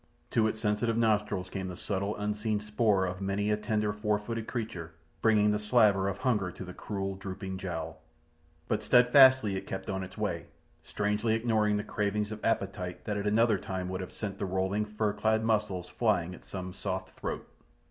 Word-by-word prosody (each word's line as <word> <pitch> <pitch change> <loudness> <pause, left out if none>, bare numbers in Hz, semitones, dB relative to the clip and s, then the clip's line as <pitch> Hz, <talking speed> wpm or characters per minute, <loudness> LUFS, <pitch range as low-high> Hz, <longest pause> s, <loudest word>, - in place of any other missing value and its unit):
To 110 -2 +3
its 110 - -3
sensitive 105 +2 +1
nostrils 105 -4 +1
came 95 0 -4
the 90 -1 -6
subtle 100 0 -2
unseen 105 +1 -1
spoor 105 -2 +2
of 90 +1 -4
many 100 +2 0
a - - +4
tender 105 -1 0
four 105 0 +1
footed 115 +2 -5
creature, 90 -9 -4 0.3
bringing 105 -2 +4
the 105 - +1
slaver 105 -3 +4
of 100 0 -2
hunger 105 -7 +1
to 95 - -8
the 90 - -8
cruel, 95 0 -3
drooping 95 0 -6
jowl. 80 -4 -5 0.7
But 110 - 0
steadfastly 125 -3 +6
it 95 - -5
kept 95 +1 -4
on 95 0 -2
its 95 - -10
way, 95 -6 -2 0.3
strangely 105 +2 0
ignoring 110 -2 +2
the 105 - -2
cravings 105 +1 -1
of 110 0 -7
appetite 95 -5 -1
that 105 -1 -1
at 100 0 -2
another 110 -1 +3
time 95 -1 -4
would 95 0 -3
have 95 - -6
sent 100 -2 -5
the 100 - -1
rolling, 95 +3 0
fur 105 0 -1
clad 110 +1 +1
muscles 100 -5 0
flying 90 -6 +1
at - - -13
some 95 -1 -6
soft - - -4
throat. - - -4
105 Hz, 190 wpm, -30 LUFS, 95-110 Hz, 0.7 s, steadfastly